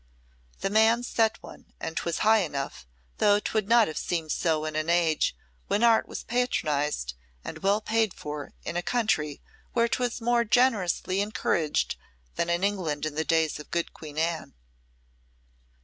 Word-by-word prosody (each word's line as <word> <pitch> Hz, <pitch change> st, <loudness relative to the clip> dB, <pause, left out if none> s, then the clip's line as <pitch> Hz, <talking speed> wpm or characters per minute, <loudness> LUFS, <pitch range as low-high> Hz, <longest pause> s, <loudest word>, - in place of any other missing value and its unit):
The 195 Hz, -, -1 dB
man 220 Hz, +3 st, +4 dB
set 225 Hz, -2 st, +1 dB
one -, -, -13 dB
and 160 Hz, -, -5 dB
'twas 170 Hz, 0 st, -1 dB
high 215 Hz, -4 st, +5 dB, 0.7 s
though 205 Hz, 0 st, +5 dB
'twould 215 Hz, -1 st, -1 dB
not 235 Hz, -2 st, +6 dB
have 155 Hz, -, -4 dB
seemed 165 Hz, -3 st, -2 dB
so 155 Hz, -2 st, 0 dB
in 155 Hz, -1 st, -4 dB
an 155 Hz, +1 st, -1 dB
age 170 Hz, -, +2 dB, 0.3 s
when 210 Hz, -, +1 dB
art 230 Hz, -1 st, +5 dB
was -, -, -6 dB
patronised 150 Hz, -, 0 dB, 0.3 s
and 155 Hz, -, -7 dB
well 200 Hz, +4 st, +2 dB
paid 220 Hz, -2 st, +1 dB
for 150 Hz, -1 st, -6 dB
in 170 Hz, -, -4 dB
a 175 Hz, -, +1 dB
country 175 Hz, -10 st, 0 dB, 0.3 s
where 235 Hz, -1 st, +3 dB
'twas 245 Hz, 0 st, -1 dB
more 240 Hz, 0 st, +2 dB
generously 210 Hz, -5 st, +2 dB
encouraged 170 Hz, -7 st, 0 dB, 0.4 s
than 170 Hz, -, -1 dB
in 170 Hz, +2 st, 0 dB
England 170 Hz, -8 st, -1 dB
in 155 Hz, -, -3 dB
the 155 Hz, +2 st, -1 dB
days 160 Hz, -2 st, +1 dB
of 150 Hz, -, -10 dB
good 170 Hz, -1 st, -2 dB
Queen 150 Hz, -2 st, -10 dB
Anne. 165 Hz, -, -1 dB
175 Hz, 160 wpm, -27 LUFS, 155-220 Hz, 0.7 s, not